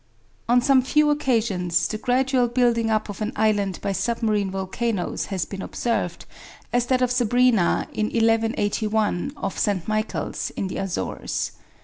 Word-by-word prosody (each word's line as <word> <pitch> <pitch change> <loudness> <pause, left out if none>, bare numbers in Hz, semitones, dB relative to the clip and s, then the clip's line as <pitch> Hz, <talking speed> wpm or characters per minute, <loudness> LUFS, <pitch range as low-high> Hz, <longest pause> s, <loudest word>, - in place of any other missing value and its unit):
On 245 +1 +5
some 270 -1 +5
few 300 +3 +3
occasions, 225 - +1
the 215 - -4
gradual 255 +1 +2
building 235 -2 +2
up 215 -1 +1
of 205 0 -7
an 215 +2 -1
island 205 -3 +1
by 200 - 0
submarine 215 -1 0
volcanoes 195 +1 -2
has 190 -4 -2
been 195 -1 -7
observed, 235 +3 -2 0.5
as 245 0 +2
that 255 0 +2
of 250 - +1
Sabrina 245 -5 +3
in 215 - 0
1181, 220 -1 +1
off 195 - -4
St. 195 -5 0
Michael's, 215 0 -2
in 190 - -2
the - - -5
Azores. 195 -2 -3
225 Hz, 145 wpm, -23 LUFS, 205-245 Hz, 0.5 s, On